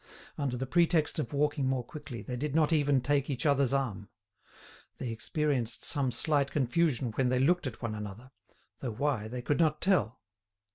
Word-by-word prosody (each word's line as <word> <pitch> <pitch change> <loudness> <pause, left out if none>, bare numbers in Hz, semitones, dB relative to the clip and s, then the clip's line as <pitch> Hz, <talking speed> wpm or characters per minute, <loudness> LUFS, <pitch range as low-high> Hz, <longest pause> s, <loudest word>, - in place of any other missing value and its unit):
Under 135 -4 -2
the 130 - -2
pretext 165 +1 +2
of 150 - -3
walking 145 -1 +1
more 130 -2 0
quickly 125 -4 -8
they 125 - -5
did 145 +3 -3
not 160 0 +3
even 145 -3 +3
take 140 +2 +1
each 135 -1 -2
other's 140 -3 +3
arm. 125 -8 -2 0.9
They 125 - -4
experienced 125 +1 -1
some 140 -4 +1
slight 140 +2 +2
confusion 135 -2 +1
when 125 +3 +1
they 130 - +2
looked 165 +3 +2
at 125 -1 -8
one 115 -2 -2
another, 105 +4 -7 0.5
though 125 -4 -4
why 120 -3 -1
they 125 +2 -6
could 145 +4 0
not 155 -2 +2
tell. 130 - +1
135 Hz, 180 wpm, -30 LUFS, 125-150 Hz, 0.9 s, not